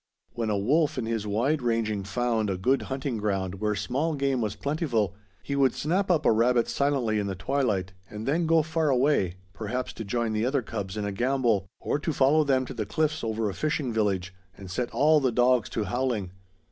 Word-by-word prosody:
When 115 -2 -2
a 105 - +1
wolf 145 +10 +2
in 125 - -1
his 110 -2 -2
wide 125 +9 +1
ranging 115 -4 0
found 110 +1 0
a 95 - -1
good 130 +9 +2
hunting 135 -2 -2
ground 95 -2 -2
where 105 -1 +1
small 145 +10 -1
game 135 -3 0
was 105 -2 -2
plentiful, 125 - -1 0.3
he 140 - -3
would 135 -3 +3
snap 185 +6 0
up 160 -4 +2
a - - +6
rabbit 115 +1 +3
silently 135 -7 +1
in 100 - -1
the 95 - -3
twilight 100 -4 -1 0.2
and 105 +2 -7
then 165 +4 +1
go 165 -1 +4
far 160 0 0
away, 130 - +2 0.2
perhaps 120 +5 -4
to - - -6
join 115 +2 -1
the 110 0 0
other 130 +1 +1
cubs 100 -2 -5
in 105 - -2
a 100 - -2
gambol, 120 -3 +1
or - - -1
to 155 +1 -2
follow 145 +3 +4
them 130 -2 +2
to - - -7
the 110 -2 -4
cliffs 155 +4 0
over 110 -1 -1
a 100 - -2
fishing 150 -3 -1
village 95 -4 0 0.2
and 95 -2 -9
set 120 +6 -2
all 155 +2 +4
the 130 -3 +1
dogs 125 0 +3
to 110 - -2
howling. 115 -3 -1
120 Hz, 210 wpm, -27 LUFS, 105-140 Hz, 0.3 s, a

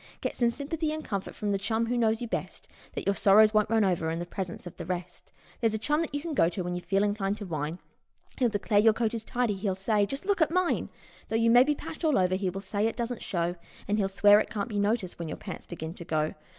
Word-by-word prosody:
Get - - -3
some 240 -1 +3
sympathy 300 +5 -2
and 310 0 -5
comfort 200 -2 -4
from 205 -1 -2
the 200 - 0
chum 225 +3 0
who 240 +2 -1
knows 225 -1 +1
you - - -3
best, - - -5 0.3
Then - - -3
your 200 - +3
sorrows 210 +2 +5
won't 215 -1 +3
run 220 -2 +3
over 170 -4 0
in 165 - -2
the 175 - -3
presence 180 0 -6
of 175 - -9
the 170 - -6
rest; 180 -1 -5 0.3
There's 225 -2 +1
a - - +1
chum 295 +8 +1
that 330 - -3
you - - 0
can 330 0 -4
go 165 - +4
to 180 +1 -4
when 175 0 -3
you 180 - -3
feel 195 +3 +1
inclined 205 -1 0
to 210 - -6
whine, 155 -1 -3 0.6
He'll 245 -2 +3
declare 205 0 +1
your 220 +1 +6
coat 225 0 0
is 230 -1 -3
tidy, 240 -2 0
and 190 - -8
he'll 195 -3 0
say: 205 +1 +1
"Just 275 - -5
look 400 -3 +1
at 320 - +4
mine 360 +1 0 0.2
!" - - -25
Though 220 - -1
you 230 0 +4
may 245 +2 +8
be 295 +2 +1
patched 315 - -8
all 310 -3 +3
over 185 -1 +2
he 190 0 0
will 195 +2 -5
say 205 +2 0
it 225 - -3
doesn't 240 0 -3
show, 175 -1 -2 0.3
And 210 +1 +1
he'll 195 - +2
swear 205 +2 +6
it 215 - -2
can't 205 +1 -3
be 205 -2 -2
noticed 205 -3 0
when 170 - -4
your - - -5
pants - - -8
begin 160 -1 -6
to 175 - -9
go. 155 -2 0
205 Hz, 280 wpm, -28 LUFS, 185-235 Hz, 0.6 s, may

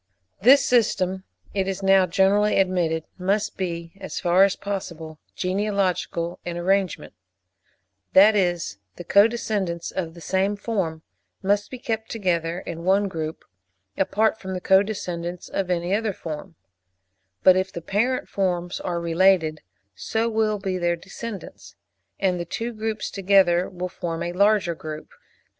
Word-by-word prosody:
This 265 +6 +7
system, 190 -6 +1 0.3
it 195 -1 0
is 195 0 -3
now 195 -1 +5
generally 195 +4 +3
admitted, 175 -4 +1 0.2
must 205 +3 0
be, 170 -3 -4
as - - -5
far 180 +2 +4
as 195 -1 +3
possible, 170 -6 -6 0.2
genealogical 185 -3 -1
in 175 -1 -4
arrangement,—that 100 - 0
is, 175 - 0 0.2
the - - -8
co 200 +5 +6
descendants 200 -7 -3
of 165 -3 -4
the - - -11
same 190 +4 0
form 190 -7 -3 0.4
must 205 +1 +1
be 255 - -7
kept 225 -2 -3
together 175 -5 -1
in 170 0 -7
one 195 +3 +3
group, 160 -2 -5 0.5
apart 220 +3 +1
from 190 -2 -5
the - - -2
co 190 +1 +5
descendants 180 -4 -5
of 195 -2 -2
any 175 +1 0
other 215 0 0
form; 165 +1 -7 0.9
but 185 - +7
if 190 +1 0
the 170 - -5
parent 225 +9 0
forms 180 -2 -1
are 175 -1 -2
related, 170 -2 +2 0.3
so 220 - -1
will 220 -2 +1
be 190 -2 -3
their 175 0 +1
descendants, 195 +4 -9 0.4
and 185 -2 +1
the - - -2
two 230 +7 -4
groups 220 -1 -3
together 190 -2 +3
will 180 0 -4
form 170 -2 -4
a 175 - -3
larger 200 -2 +3
group. 155 -1 -8
185 Hz, 145 wpm, -24 LUFS, 170-200 Hz, 0.9 s, This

